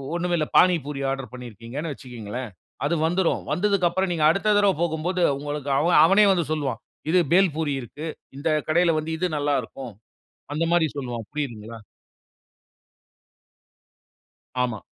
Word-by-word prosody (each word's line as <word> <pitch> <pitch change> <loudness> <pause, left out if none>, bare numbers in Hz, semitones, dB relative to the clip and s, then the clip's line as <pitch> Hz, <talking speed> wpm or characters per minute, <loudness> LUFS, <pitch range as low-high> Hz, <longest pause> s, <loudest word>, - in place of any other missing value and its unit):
ஒன்னுமே 175 0 0
இல்லை. 155 - 0
பானி 180 -1 +6
பூரி 140 -2 -5
ஆர்டர் 135 -4 -5
பண்ணியிருக்கீங்கன்னு 125 +5 -6
வச்சுகங்களேன். 125 -2 -7 0.4
அது 170 - +1
வந்துரும். 175 +1 +1
வந்ததுக்கு 195 -2 +2
அப்புறம் 190 +2 -1
நீங்க 155 -3 +1
அடுத்த 210 +5 +2
தடவ 200 -2 +4
போகும்போது 170 +2 -1 0.2
உங்களுக்கு 145 -1 -4
அவ 165 +4 +2 0.2
அவனே 200 +4 +5
வந்து 175 -4 +1
சொல்வான். 140 -6 -2 0.3
இது 180 +2 +4
பேல் 185 -4 +4
பூரி 150 -3 0
இருக்கு. 150 +7 -8 0.3
இந்த 155 +4 -3 0.2
கடையில் 165 0 +3
வந்து 160 +1 -4
இது 180 - -1
நல்லா 145 0 +1
இருக்கும். 130 -5 -9 0.6
அந்த 165 +2 0
மாதிரி 170 -2 +4
சொல்வான். 120 -5 -5
புரியுதுங்களா? 115 -6 -5 2.9
ஆமா. 115 -4 -2
155 Hz, 140 wpm, -24 LUFS, 130-175 Hz, 2.9 s, பானி